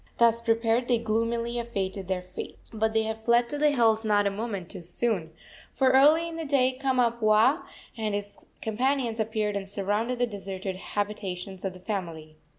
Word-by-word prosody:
Thus 230 0 +4
prepared 230 +1 +1
they 245 - +3
gloomily 230 +1 -1
awaited 195 -5 -3
their 185 -1 -2
fate. 185 0 -8 0.2
But 220 0 0
they 220 0 +3
had 220 0 -4
fled 235 +1 +4
to 290 - -3
the 300 0 +5
hills 225 -5 +3
not 205 -2 +3
a 200 - +2
moment 200 -4 -4
too 190 - -7
soon, 175 -1 -2 0.4
for 260 -1 +3
early 300 +5 +5
in 330 -1 -6
the 325 - -3
day 275 -3 +3
Kamapuaa 235 -2 +3 0.3
and 215 -3 -2
his 205 0 -7 0.2
companions 240 +1 0
appeared 215 -1 -1
and 195 -1 -3
surrounded 210 +5 -1
the 245 - +2
deserted 195 -3 -5
habitations 195 -2 -4
of 190 -2 -2
the 185 - -12
family. 170 -6 -5
220 Hz, 175 wpm, -27 LUFS, 200-240 Hz, 0.4 s, the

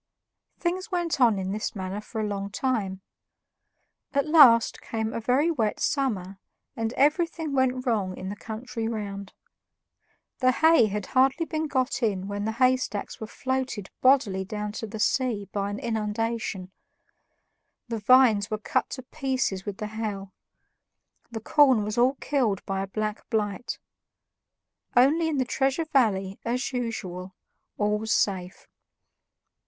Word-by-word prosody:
Things 370 +2 -2
went 345 -6 -1
on 230 -4 +5
in 190 0 -3
this 215 +2 -3
manner 190 +1 -4
for 220 +1 -7
a 215 - 0
long 200 -1 -3
time. 200 -5 -2 1.1
At 280 - +2
last 280 -8 +6
came 220 -1 -3
a - - -2
very 260 +8 +2
wet 225 -9 -1
summer, 200 -9 -1 0.4
and 225 0 -2
everything 315 +2 +1
went 260 -1 +1
wrong 205 -6 0
in 190 - -5
the 205 - -5
country 225 +2 -5
round. 200 -3 -5 1.1
The 255 -1 +4
hay 320 -7 +5
had 210 -1 -3
hardly 270 +5 +2
been 315 -1 -2
got 260 -2 -1
in 195 -4 0
when 205 0 -3
the 220 - -1
haystacks 255 -4 0
were 220 - -4
floated 260 -5 -3
bodily 255 -8 +3
down 210 +2 -4
to 220 +1 -5
the 215 - -7
sea 225 -2 0
by 200 -1 -2
an 205 - -4
inundation; 220 -3 -2 1.2
the 230 -2 -3
vines 220 -2 +5
were 215 - -1
cut 215 - -1
to 260 - -6
pieces 260 -9 -2
with 200 -1 -4
the 215 - -4
hail; 210 -3 -5 1.0
the 225 -2 -6
corn 260 -3 +4
was 210 +2 -2
all 255 +3 +4
killed 245 -10 -1
by 195 0 -2
a 195 - -3
black 215 +2 -4
blight. 215 +1 -2 1.2
Only 300 +7 +5
in 310 -3 -1
the 260 - +1
Treasure 270 +6 0
Valley, 200 -10 +1
as 250 +3 -2
usual, 190 -7 -4 0.4
all 210 0 +1
was 220 +1 -3
safe. 190 -5 0
225 Hz, 150 wpm, -26 LUFS, 205-260 Hz, 1.2 s, last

